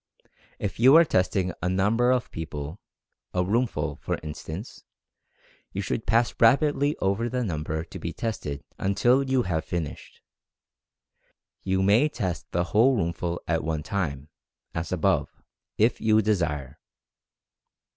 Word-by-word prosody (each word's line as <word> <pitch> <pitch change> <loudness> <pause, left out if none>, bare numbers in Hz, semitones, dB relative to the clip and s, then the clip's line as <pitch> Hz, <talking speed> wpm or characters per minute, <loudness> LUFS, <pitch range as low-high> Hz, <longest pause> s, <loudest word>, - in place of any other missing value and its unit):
If 100 0 -4
you 130 +5 +7
are 165 +1 +8
testing 90 - +1
a 90 - 0
number 105 +6 +2
of 125 -1 +1
people 75 +2 -6 0.3
— - - -56
a 90 - +2
roomful, 115 +6 -1
for - - -3
instance, 80 +7 -7 0.9
you 100 - -2
should 110 +5 -3
pass 115 +1 +3
rapidly 145 +4 +4
over 100 +5 0
the 125 0 -1
number 80 -4 -3
to - - -10
be - - -4
tested 75 -11 -4 0.2
until 120 +7 +3
you 130 -2 +1
have 80 -4 -1
finished. 80 -2 -5 1.4
You 95 0 0
may 110 +10 +4
test 95 - -4
the 85 - 0
whole 125 +5 +5
roomful 85 -1 -2
at 80 -1 0
one 80 -1 -2
time, 75 -7 -3 0.4
as 80 -1 -4
above, - - 0 0.3
if 110 +2 +2
you 110 0 +4
desire. 75 -9 -1
95 Hz, 135 wpm, -26 LUFS, 80-115 Hz, 1.4 s, are